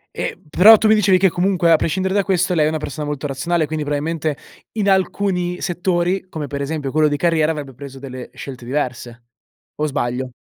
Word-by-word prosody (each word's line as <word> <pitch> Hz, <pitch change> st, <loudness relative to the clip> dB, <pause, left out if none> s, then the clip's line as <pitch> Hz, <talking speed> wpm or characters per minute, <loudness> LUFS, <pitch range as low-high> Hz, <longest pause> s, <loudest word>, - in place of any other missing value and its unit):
Ehm, -, -, -4 dB
però 210 Hz, +8 st, +8 dB
tu 215 Hz, -, +1 dB
mi 215 Hz, -, +6 dB
dicevi 195 Hz, -3 st, +4 dB
che 190 Hz, 0 st, +4 dB
comunque, 175 Hz, -2 st, +2 dB
a -, -, +8 dB
prescindere 190 Hz, +4 st, -1 dB
da 200 Hz, -1 st, +2 dB
questo, 185 Hz, -1 st, +1 dB
lei 155 Hz, -3 st, +3 dB
è -, -, +2 dB
una 160 Hz, -, -2 dB
persona 150 Hz, 0 st, -5 dB
molto 145 Hz, 0 st, -4 dB
razionale 155 Hz, +4 st, -1 dB
quindi 155 Hz, 0 st, -3 dB
probabilmente 150 Hz, +1 st, -2 dB, 0.4 s
in 210 Hz, -2 st, -1 dB
alcuni 185 Hz, -2 st, 0 dB
settori 180 Hz, +1 st, -1 dB
come, 155 Hz, -4 st, -5 dB
per 140 Hz, 0 st, -5 dB
esempio, 140 Hz, -2 st, -3 dB
quello 155 Hz, 0 st, +3 dB
di 145 Hz, 0 st, -1 dB
carriera, 160 Hz, -2 st, +2 dB
avrebbe 145 Hz, -4 st, -6 dB
preso 135 Hz, +1 st, -10 dB
delle 130 Hz, -2 st, -8 dB
scelte 130 Hz, -3 st, -9 dB
diverse 120 Hz, -3 st, -4 dB, 0.5 s
o 155 Hz, -, -1 dB
sbaglio? 125 Hz, -2 st, -3 dB
155 Hz, 200 wpm, -19 LUFS, 140-180 Hz, 0.5 s, però